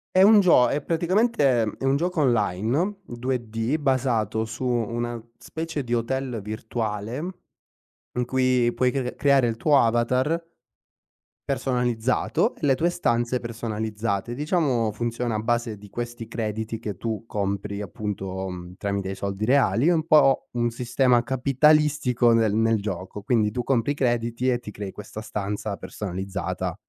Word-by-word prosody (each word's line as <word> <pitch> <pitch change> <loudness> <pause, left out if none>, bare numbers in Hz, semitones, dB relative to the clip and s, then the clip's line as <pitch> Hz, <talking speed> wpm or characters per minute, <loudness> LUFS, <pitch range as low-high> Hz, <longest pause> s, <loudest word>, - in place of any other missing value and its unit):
È 185 - +6
un 210 +1 +8
gio 165 -10 +6
è 145 +3 -1
praticamente 170 - +2 0.2
è - - -9
un 135 +1 +3
gioco 170 +1 0
online 120 - +1
2D 120 +1 -2
basato 120 -6 0
su 115 +3 -7
una 120 -1 -1 0.2
specie 160 -2 -5
di 120 -1 -3
hotel 125 +1 -1
virtuale 110 +1 -4 1.0
in 125 - +1
cui 125 -1 +2
puoi 125 -1 +2
cre 125 -2 -3
creare 140 -3 +3
il 115 -1 -1
tuo 145 +2 +4
avatar, 125 +8 +2 1.0
personalizzato 125 - 0
e - - -8
le 135 -2 +4
tue 165 +6 +1
stanze 120 -7 0
personalizzate. 110 -2 -3
Diciamo, 135 - +1
funziona 120 +1 -2
a 105 - 0
base 120 -1 -1
di 100 0 -14
questi 120 0 -5
crediti 110 0 -3
che 105 -3 -5
tu 110 +2 -4
compri 100 0 -3
appunto, 95 -1 -4
mhmm, 90 -1 -8
tramite 100 -1 -2
i - - -3
soldi 100 +1 -3
reali 135 +3 +3
è - - +5
un 160 -1 0
po' 140 -4 +4
un 120 -1 0
sistema 125 +1 +2
capitalistico 135 -1 +3
nel 110 -2 +3
nel 115 -1 +2
gioco. 95 0 -5
Quindi 110 -2 +1
tu 120 +3 -2
compri 130 +1 +1
crediti 120 -2 0
e 125 - +2
ti 105 - -9
crei 100 -1 -6
questa 105 +1 -8
stanza 105 -1 -4
personalizzata 95 -1 -4
120 Hz, 145 wpm, -25 LUFS, 110-135 Hz, 1.0 s, un